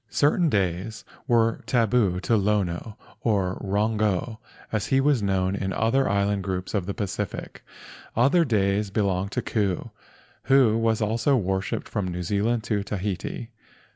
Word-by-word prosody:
Certain 155 +3 +2
days 100 +1 -1 0.2
were 115 -1 +2
tabu 115 -6 +2
to 115 - +2
Lono—or 100 0 -1
Rongo, 105 +1 0 0.3
as 105 -2 -1
he 135 - +3
was 135 -3 +3
known 95 -1 0
in 95 -1 -2
other 130 +5 +2
island 100 0 +1
groups 95 -1 -3
of 100 -4 -1
the 100 - -3
Pacific 100 -2 -4 0.5
Ocean. 120 - +5
Other 170 +5 +4
days 105 -5 +1
belonged 100 -1 0
to - - -1
Ku—who 110 +4 0
was 115 -1 +1
also 115 +6 +2
worshipped 95 -2 -2
from 100 -4 -2
New 90 0 -4
Zealand 105 +5 0
to 110 -3 -1
Tahiti. 100 +3 -4
105 Hz, 140 wpm, -25 LUFS, 95-115 Hz, 0.5 s, Ocean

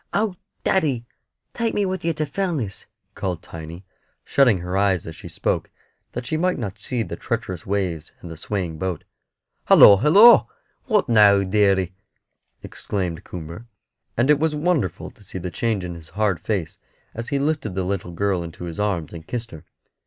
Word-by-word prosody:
"Oh, 205 -1 +1 0.3
daddy, 140 -11 +1 0.5
take 230 -1 -1
me 205 - +2
with 185 -1 -3
yer 165 0 +1
to 155 0 -2
Fellness," 145 - -3 0.3
called 90 -4 -4
Tiny, 80 +3 -9 0.4
shutting 125 -7 +4
her 90 +1 -4
eyes 95 -3 +2
as 80 - -7
she - - -10
spoke - - -2 0.4
that 125 - -5
she 155 - -1
might 180 +2 +1
not 105 -7 -5
see 125 -3 -2
the 90 - -6
treacherous 90 -3 -4
waves 90 -5 -2
and 85 - -9
the - - -7
swaying 85 -1 -4
boat. 95 -3 -3 0.6
"Halloo, 100 - +9
halloo! 195 - +7 0.4
What 210 - +2
now, 105 -4 +6
deary?" 95 -2 +2 0.7
exclaimed 90 -4 -4
Coomber. 85 +7 -8 0.5
And 125 +5 +4
it 150 - +4
was 160 -1 +1
wonderful 150 - -1
to - - -24
see 95 - -8
the 90 0 -5
change 110 -1 -1
in 90 -1 -5
his 85 -1 -11
hard 105 -5 0
face 95 -2 -3 0.3
as 115 +1 -6
he 140 - 0
lifted 140 -8 -1
the 95 - 0
little 90 -2 -3
girl 95 +1 0
in 85 -1 -6
his 85 +1 -7
arms 90 -8 -1
and 80 -1 -9
kissed 115 -1 -4
her. 80 - -11
100 Hz, 175 wpm, -22 LUFS, 90-140 Hz, 0.7 s, Halloo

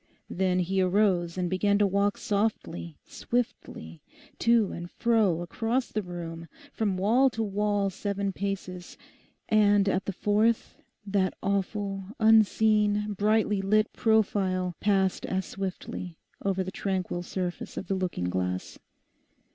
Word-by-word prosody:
Then 185 0 +1
he 190 +2 0
arose 185 -2 +2
and 180 -1 0
began 200 +3 +2
to 205 - +4
walk 200 +1 +1
softly, 200 -7 -2
swiftly, 85 - -4 0.4
to 230 -3 +3
and 175 0 -6
fro 215 -8 +2
across 230 +8 -2
the 215 - -1
room—from 175 - -5
wall 235 +8 +4
to 225 -2 -3
wall 205 -1 0
seven 200 0 -2
paces, 185 -3 -5 0.5
and 205 -2 +4
at 195 0 0
the - - -1
fourth, 210 +4 +1 0.3
that 195 -2 0
awful, 195 0 -2
unseen, 215 -1 +4
brightly 210 0 +2
lit 215 +2 +2
profile 190 -5 +1
passed 195 -2 +1
as 190 -1 -1
swiftly 185 -2 -6 0.3
over 195 -1 0
the 185 - -5
tranquil 185 -3 -2
surface 180 0 -5
of - - -4
the - - 0
looking 180 - -2
glass. 90 0 -3
195 Hz, 125 wpm, -28 LUFS, 185-210 Hz, 0.5 s, to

